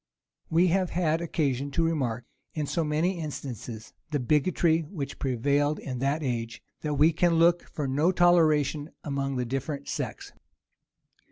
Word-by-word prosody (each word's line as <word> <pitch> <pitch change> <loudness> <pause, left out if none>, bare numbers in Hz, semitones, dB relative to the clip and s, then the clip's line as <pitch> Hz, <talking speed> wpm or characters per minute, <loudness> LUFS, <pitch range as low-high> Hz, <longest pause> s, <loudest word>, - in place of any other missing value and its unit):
We 175 +3 +4
have 185 0 +1
had 165 -2 0
occasion 145 -5 -1
to 165 - +2
remark, 130 -8 -1 0.3
in 155 -2 -1
so 165 +3 -1
many 160 +4 0
instances, 125 -7 -6 0.2
the 150 -2 -1
bigotry 160 +5 +2
which 150 -3 -6
prevailed 140 +4 +1
in 125 -3 -5
that 140 +4 0
age, 115 -3 -3 0.2
that 150 -1 -2
we 155 +3 +4
can 170 +1 +2
look 170 +1 +3
for 145 -3 -3
no 145 +7 +2
toleration 155 -4 +3
among 140 -2 -2
the 125 -1 -1
different 135 +3 -4
sects. - - -5
150 Hz, 150 wpm, -27 LUFS, 135-165 Hz, 0.3 s, We